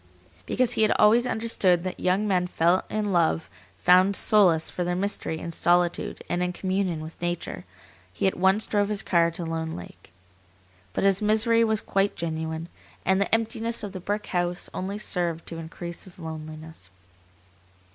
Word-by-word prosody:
Because 250 -1 +2
he 230 -3 +3
had 215 - +4
always 230 +4 +5
understood 200 -7 +1
that 185 - -5
young 190 +4 +1
men 180 -2 +1 0.4
in 210 -1 -2
love 165 -2 +1 0.3
found 185 +2 +4
solace 180 -8 +4
for 180 - -3
their 175 0 -1
misery 190 -4 -2
in 170 - -6
solitude 175 +1 +1
and 175 - -1
in 180 0 -1
communion 185 -3 -2
with 160 +2 -10
nature, 175 0 -4 0.5
he 90 - -3
at 190 - +2
once 190 +4 +3
drove 205 -1 0
his 210 -2 +1
car 170 -2 +3
to 170 +1 -6
Lone 160 0 -3
Lake. 90 - -12 0.8
But - - -1
his 195 0 +3
misery 220 +2 +4
was 220 -1 +2
quite 195 +1 0
genuine, 160 0 -4 0.4
and 190 +1 +2
the 200 - -1
emptiness 225 0 0
of 205 - -5
the 185 - -7
brick 205 +3 -3
house 175 -1 -2
only 195 +2 -4
served 175 -5 -2
to 165 - -6
increase 170 +1 -8
his 185 - -11
loneliness. 155 - -9
180 Hz, 165 wpm, -25 LUFS, 170-205 Hz, 0.8 s, always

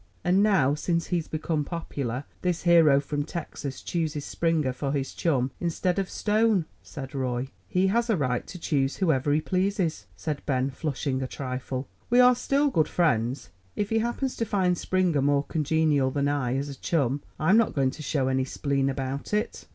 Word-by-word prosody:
"And 185 +3 +3
now, 190 -10 +4
since 165 +2 -1
he's 170 -3 0
become 155 -1 -1
popular, 140 -6 -4 0.2
this 180 -2 -1
hero 165 -5 +6
from 145 +1 -2
Texas 145 -4 -6
chooses 155 -4 -2
Springer 160 -6 0
for 135 +2 -3
his 135 -2 -2
chum 135 -6 0
instead 175 +2 0
of 195 - -2
Stone," 215 -4 +2 0.2
said 135 -2 -8
Roy. 130 -1 -2 0.2
"He 185 +1 +1
has 235 +5 +1
a 220 - +3
right 125 -4 -1
to 180 - -8
choose 140 -5 0
whoever 145 -6 +1
he 150 +2 +3
pleases," 185 -1 -1
said 150 -3 -3
Ben, 135 -1 +1
flushing 135 -2 -2
a 130 - -2
trifle. 130 0 -4 0.2
"We 245 - +4
are 250 0 +8
still 280 +3 +1
good 155 -9 +2
friends. 125 - 0 0.2
If 205 0 -2
he 225 - +3
happens 240 +3 -2
to 230 - 0
find 190 -4 +1
Springer 180 -5 +1
more 140 0 +2
congenial 155 -3 +1
than 140 +1 0
I, 135 -3 0
as 140 +1 -2
a - - -5
chum, 140 -4 0 0.2
I'm 180 +8 +4
not 230 - +2
going 135 -2 +2
to 155 - -10
show 140 -2 0
any 130 0 +1
spleen 135 0 0
about 135 +6 -3
it." 210 - -3
150 Hz, 185 wpm, -26 LUFS, 135-180 Hz, 0.2 s, are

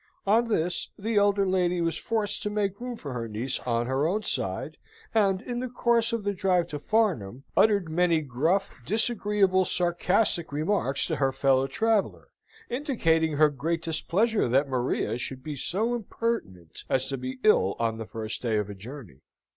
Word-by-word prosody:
On 220 +4 +4
this, 175 -5 0
the 220 +1 -1
elder 200 -1 +3
lady 180 -1 +1
was 165 -1 0
forced 215 +2 -1
to 210 - -2
make 205 0 -2
room 250 -1 -4
for 145 - -7
her 115 -2 -4
niece 115 +5 -2
on 120 0 +1
her 135 +4 +1
own 210 +5 -1
side, - - -2 0.4
and, 195 -3 +2
in 240 -1 -4
the 255 - -3
course 235 -1 +2
of 230 -2 -2
the 205 0 0
drive 185 -2 +1
to 150 - -5
Farnham, 150 - 0
uttered 205 -5 +4
many 165 0 +2
gruff, 155 +8 0
disagreeable, 205 - +2
sarcastic 175 0 +1
remarks 155 -1 0
to - - -2
her 135 -1 +2
fellow 135 0 +2
traveller, 220 +7 0 0.4
indicating 170 - +1
her 150 +1 +5
great 165 +4 -2
displeasure 190 - +1
that 135 +4 +3
Maria 125 -2 -1
should 130 0 -4
be 155 - -5
so 205 - 0
impertinent 215 - -4
as 130 0 +2
to 135 - -3
be 130 0 -5
ill 95 +1 +4
on 115 -1 -1
the 110 - -6
first 110 -1 -5
day 115 -3 0
of 105 -1 -2
a - - -6
journey. 105 - -10
170 Hz, 175 wpm, -27 LUFS, 130-210 Hz, 0.4 s, her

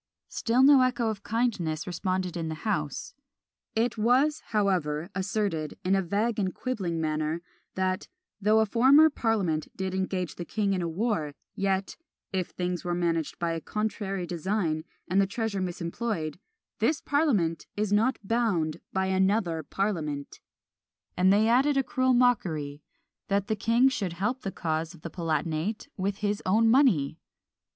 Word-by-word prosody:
Still 245 +3 +2
no 275 -1 +8
echo 250 -2 +1
of 210 -2 -4
kindness 205 -10 -1
responded 185 0 -2
in 165 -2 -3
the 160 +4 -7
house. 150 -10 -2 0.6
It 225 0 0
was, 260 +7 +3
however, 180 -6 0
asserted, 190 -5 -2
in 185 - +3
a 195 - +2
vague 210 +5 0
and 190 -2 -1
quibbling 190 -10 -2
manner, 155 +1 -1 0.3
that 185 +1 -1 0.3
"though 215 +2 +4
a - - +3
former 270 +8 +6
parliament 200 - 0
did 190 -1 -2
engage 185 -3 -2
the 175 - -4
king 200 +3 0
in 185 - -1
a 170 - -1
war, 165 -5 -1 0.2
yet, 195 0 -1 0.4
(if 185 -2 0
things 180 -1 -3
were 175 -1 -1
managed 165 -3 -1
by 170 -1 -1
a 165 -1 -3
contrary 205 -3 -2
design, 170 -2 -1 0.2
and 190 +2 +3
the 195 - +2
treasure 210 -1 -2
misemployed) 175 -1 -3 0.4
this 310 - +2
parliament 225 - +1
is 210 -1 0
not 230 +6 +3
bound 195 -8 0
by 190 0 0
another 190 -3 +1
parliament:" 155 -5 -3 0.8
and 185 +1 +4
they 210 +2 +4
added 270 +5 +3
a 270 - +3
cruel 255 0 +1
mockery, 160 - +1 0.5
"that 200 0 +1
the 220 - -1
king 230 +5 +3
should 205 -10 -1
help 210 +9 -2
the 195 - -3
cause 160 0 -2
of 155 - -19
the 170 - -6
Palatinate 165 +4 -2
with 195 +1 -2
his 205 0 0
own 220 +4 +3
money!" 185 - +3
190 Hz, 155 wpm, -28 LUFS, 170-225 Hz, 0.8 s, no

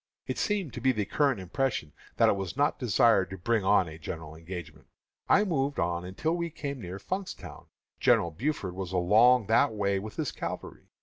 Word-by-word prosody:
It - - -3
seemed 195 - -1
to 120 - -6
be 130 +2 +4
the 105 -5 -1
current 140 -1 +1
impression 95 - -2 0.2
that - - +5
it - - +4
was 95 +4 -5
not 145 - +1
desired 115 -5 +3
to 95 - -7
bring 110 +3 0
on 95 -2 +4
a 80 0 -9
general 80 0 -7
engagement. 80 -2 -9 0.4
I 205 - +6
moved 145 -7 -1
on 85 +1 -1
until 155 - -1
we 170 -1 -2
came 140 -4 -5
near 90 0 -6
Funkstown. 185 - -6 0.3
General 85 - +3
Buford 105 - -2
was 95 -1 -5
along 110 +7 +5
that 115 +5 +3
way 100 -2 0
with 105 +2 -8
his - - -2
cavalry. - - -6
105 Hz, 190 wpm, -29 LUFS, 90-135 Hz, 0.4 s, I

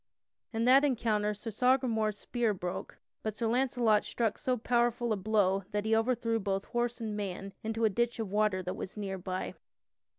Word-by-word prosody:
In 225 0 0
that 265 +3 +7
encounter 215 -6 +1
Sir 225 +2 -6
Sagramore's 230 -3 +2
spear 230 -1 -1
broke, 180 -1 -5 0.2
but 215 -1 -3
Sir 230 - -2
Launcelot 235 -3 +2
struck 225 -3 -1
so 255 -3 0
powerful 240 0 +1
a - - +1
blow 195 -1 +2
that 205 0 -2
he 220 0 +3
overthrew 230 0 +1
both 195 -1 -1
horse 240 0 -1
and 220 -2 -3
man 195 -1 -4
into 225 +1 0
a - - +5
ditch 235 +4 0
of 220 -4 -4
water 205 -3 +2
that 180 +1 -3
was 190 - -7
near 195 -2 -3
by. 185 0 -4
220 Hz, 185 wpm, -31 LUFS, 205-240 Hz, 0.2 s, that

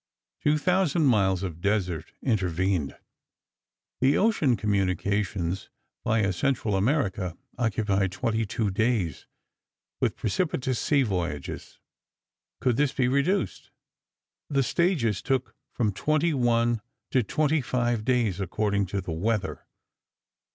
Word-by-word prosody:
Two 150 +1 +3
thousand 175 -1 +2
miles 100 -7 +3
of 85 -3 -5
desert 90 -5 -1
intervened. 95 - 0 1.0
The 135 +3 +4
ocean 165 - +3
communications, 100 -2 -1 0.3
via 110 -3 +2
Central 115 0 0
America, 95 - 0 0.2
occupied 105 -5 +1
twenty 115 +3 -1
two 105 -1 -1
days, 105 - 0 0.7
with - - +1
propitious 130 - -1
sea 140 -3 +3
voyages. 85 - -4 0.8
Could 125 -3 +2
this 145 -2 +2
be 125 -2 +1
reduced? 140 +10 0 0.8
The 140 -2 +2
stages 130 - +1
took 130 -2 -1 0.2
from 110 -5 0
twenty 155 - +1
one 120 -3 +2 0.3
to 130 - +4
twenty 150 +7 +1
five 120 -3 0
days, 120 -6 +1
according 100 +1 0
to 100 +2 -2
the 90 - -6
weather. 105 +6 -2
110 Hz, 110 wpm, -27 LUFS, 95-130 Hz, 1.0 s, The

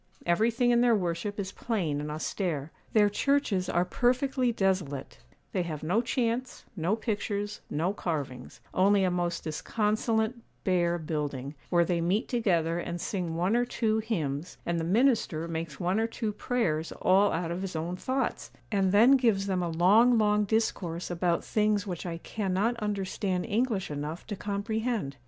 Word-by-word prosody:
Everything 230 +7 +2
in 240 0 +4
their 240 -2 +5
worship 185 +2 -2
is 190 -1 -3
plain 170 -13 -2
and 150 - -4
austere. 155 -1 -3 0.2
Their 210 -2 +5
churches 205 -4 +1
are 175 +1 +2
perfectly 250 +4 +1
desolate; 185 - -1 0.3
they 185 - 0
have 160 -4 -4
no 185 +9 +2
chants, 245 0 -2
no 180 +3 +1
pictures, 205 -2 -3
no 170 +6 0
carvings; 140 -10 -4
only 195 +1 +4
a 185 - +2
most 175 -1 -1
disconsolate, 220 +7 0 0.3
bare 175 -2 +2
building, 145 -4 -3 0.2
where 170 -1 +4
they 170 0 0
meet 190 +7 +1
together 175 -9 +1
and 175 0 -4
sing 175 -3 -3
one 180 +6 +1
or 240 - +3
two 220 -2 0
hymns, 170 -8 -3
and 170 0 0
the - - -2
minister 200 - +2
makes 160 -3 -5
one 180 +4 +1
or 225 - +1
two 225 -1 -3
prayers 175 -10 -1
all 195 +2 +3
out 165 0 -2
of 175 +2 -3
his 190 -3 -4
own 165 +3 -2
thoughts; 260 +6 -2 0.2
and 195 -3 +2
then 220 +6 +6
gives 230 -8 +4
them 190 -2 0
a 175 - -1
long, 205 +9 +5
long 210 -1 +3
discourse 185 -6 -1
about 175 0 0
things 210 -1 +1
which 180 -2 -5
I 165 -1 -3
cannot 200 +5 -1
understand 195 -3 -2
English 215 -5 0
enough 150 +3 -5
to 205 - -4
comprehend. 205 - -2
190 Hz, 165 wpm, -29 LUFS, 170-220 Hz, 0.3 s, then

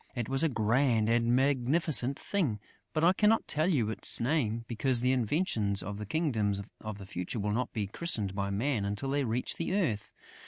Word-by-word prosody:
It 120 -3 -3
was 135 +1 +3
a 165 - +3
grand 115 -1 +2
and 120 +1 +2
magnificent 135 +1 +1
thing, 150 - -1 0.3
but 155 - -1
I 175 +2 +6
cannot 215 +3 +2
tell 155 +3 +1
you 120 - +1
its - - +2
name, 115 -4 0
because 120 +2 +1
the 125 +1 +2
inventions 115 - 0
of 100 +2 -6
the 105 - -6
Kingdom 110 -8 0 0.2
of 110 -2 -6
the 100 - -10
Future 90 +4 -5
will 105 +1 -1
not 125 +4 -1
be 105 -3 -2
christened 105 - -1
by 100 0 -2
Man 110 +3 -1
until 105 +7 -2
they 145 0 +1
reach 120 +1 -1
the 170 +3 -2
earth. 115 - -1
120 Hz, 195 wpm, -30 LUFS, 105-145 Hz, 0.3 s, I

